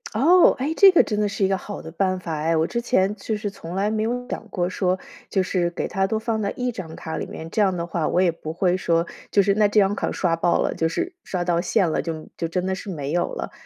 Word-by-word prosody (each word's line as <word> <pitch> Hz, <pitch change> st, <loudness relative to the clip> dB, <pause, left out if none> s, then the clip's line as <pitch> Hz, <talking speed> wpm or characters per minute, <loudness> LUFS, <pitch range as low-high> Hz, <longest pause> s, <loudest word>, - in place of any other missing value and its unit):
哦， 340 Hz, +10 st, +6 dB
哎， 280 Hz, +5 st, -1 dB
这 395 Hz, -, +8 dB
个 350 Hz, -, +5 dB
真 210 Hz, -2 st, -2 dB
的 210 Hz, -, +2 dB
是 200 Hz, 0 st, 0 dB
一 -, -, +3 dB
个 195 Hz, -, +1 dB
好 200 Hz, +2 st, -7 dB
的 160 Hz, -, -8 dB
办 185 Hz, +2 st, 0 dB
法 170 Hz, -2 st, -5 dB
哎， 160 Hz, +2 st, +1 dB
我 160 Hz, -, +2 dB
之 235 Hz, +6 st, -2 dB
前 210 Hz, -4 st, +1 dB
就 215 Hz, +1 st, -3 dB
是 205 Hz, -1 st, -4 dB
从 175 Hz, -3 st, -8 dB
来 200 Hz, +2 st, +1 dB
没 220 Hz, 0 st, -1 dB
有 245 Hz, +3 st, -2 dB
想 225 Hz, -, -6 dB
过 175 Hz, -2 st, -1 dB
说， 185 Hz, 0 st, 0 dB, 0.3 s
就 190 Hz, -2 st, +1 dB
是 175 Hz, -2 st, 0 dB
给 175 Hz, -, -3 dB
它 195 Hz, 0 st, 0 dB
都 220 Hz, -, -1 dB
放 220 Hz, 0 st, -1 dB
在 200 Hz, -, -1 dB
一 250 Hz, 0 st, -1 dB
张 170 Hz, -8 st, -7 dB
卡 160 Hz, -, -6 dB
里 -, -, -4 dB
面， 160 Hz, -, -8 dB
这 215 Hz, -, +1 dB
样 190 Hz, -3 st, +2 dB
的 170 Hz, -, -2 dB
话 170 Hz, -2 st, -1 dB
我 -, -, +1 dB
也 180 Hz, -2 st, +4 dB
不 155 Hz, -1 st, -7 dB
会 180 Hz, +2 st, +1 dB
说 170 Hz, -2 st, +1 dB, 0.2 s
就 200 Hz, -, +4 dB
是 200 Hz, -, +3 dB
那 210 Hz, 0 st, +4 dB
这 205 Hz, +1 st, +3 dB
张 195 Hz, 0 st, +3 dB
卡 -, -, -2 dB
刷 170 Hz, -3 st, +1 dB
爆 170 Hz, +1 st, +2 dB
了， -, -, -1 dB
就 165 Hz, -, 0 dB
是 355 Hz, -, -3 dB
刷 180 Hz, -2 st, -2 dB
到 170 Hz, -1 st, +1 dB
线 185 Hz, -1 st, +1 dB
了， -, -, 0 dB
就 160 Hz, -2 st, -5 dB
就 165 Hz, -, -2 dB
真 180 Hz, +2 st, -2 dB
的 190 Hz, -, 0 dB
是 195 Hz, +2 st, -6 dB
没 145 Hz, -6 st, -4 dB
有 175 Hz, +1 st, 0 dB
了， -, -, -5 dB
190 Hz, 310 characters per minute, -23 LUFS, 170-210 Hz, 0.3 s, 这